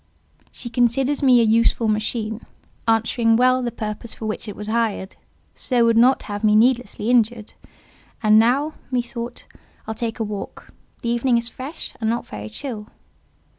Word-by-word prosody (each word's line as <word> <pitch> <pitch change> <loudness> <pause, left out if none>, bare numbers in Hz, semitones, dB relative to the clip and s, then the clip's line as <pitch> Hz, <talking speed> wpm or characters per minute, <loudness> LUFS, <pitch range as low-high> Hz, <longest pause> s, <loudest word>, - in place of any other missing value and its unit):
She 245 - -7
considers 250 +4 +1
me 255 -3 +6
a - - +4
useful 230 +1 +3
machine, 215 +1 -2 0.4
answering 225 +1 +3
well 255 +2 +4
the 240 -1 -2
purpose 215 0 -6
for 220 - -7
which 215 +1 -4
it 205 - -6
was 210 - -7
hired; 215 -3 -1 0.4
so 245 -3 +1
would 230 0 +3
not 250 +4 +4
have 205 0 -6
me 210 -1 +4
needlessly 235 -1 +2
injured. 230 -2 +1 0.7
And 215 0 +6
now," 270 +7 +2 0.2
methought, 240 -1 -4 0.4
"I'll 220 - -4
take 225 +1 -4
a - - 0
walk; 205 -2 -7 0.3
the 235 - -1
evening 240 +1 +2
is 235 0 -2
fresh, 275 +7 -7
and 220 - +1
not 235 +1 -1
very 105 0 -8
chill." 220 - -6
230 Hz, 165 wpm, -22 LUFS, 215-245 Hz, 0.7 s, me